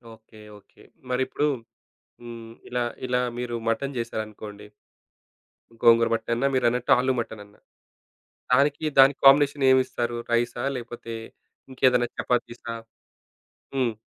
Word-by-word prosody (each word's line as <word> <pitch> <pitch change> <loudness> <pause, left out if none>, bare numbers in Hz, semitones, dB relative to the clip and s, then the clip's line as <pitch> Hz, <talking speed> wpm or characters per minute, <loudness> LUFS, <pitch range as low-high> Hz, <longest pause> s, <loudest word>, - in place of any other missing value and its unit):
Okay. 110 0 -19 0.2
Okay. - - -23 0.3
మరి 125 0 0
ఇప్పుడు 145 +3 0 0.7
హ్మ్, 115 -1 -9 0.2
ఇలా 125 0 -1 0.2
ఇలా 125 0 +1 0.2
మీరు 120 -1 -3
మటను 135 +5 -1
చేశారనుకోండి. 110 -2 -6 1.2
గోంగూర 115 0 +6
మటనన్నా, 115 +3 0
మీరన్నట్టు 125 -1 +1
ఆలు 130 +1 +1
మటనన్నా? 105 -3 -8 0.9
దానికి 140 +4 +3
దానికి 135 +1 +7
కాంబినేషన్ 140 0 +5
ఏమిస్తారు? 120 -2 0 0.2
రైసా? 120 +1 0
లేకపోతే? 115 -1 -7 0.6
ఇంకేదైనా 125 -2 +2
చపాతీసా? 120 -1 -2 1.0
హ్మ్. 125 -4 +1
120 Hz, 100 wpm, -25 LUFS, 115-130 Hz, 1.2 s, దానికి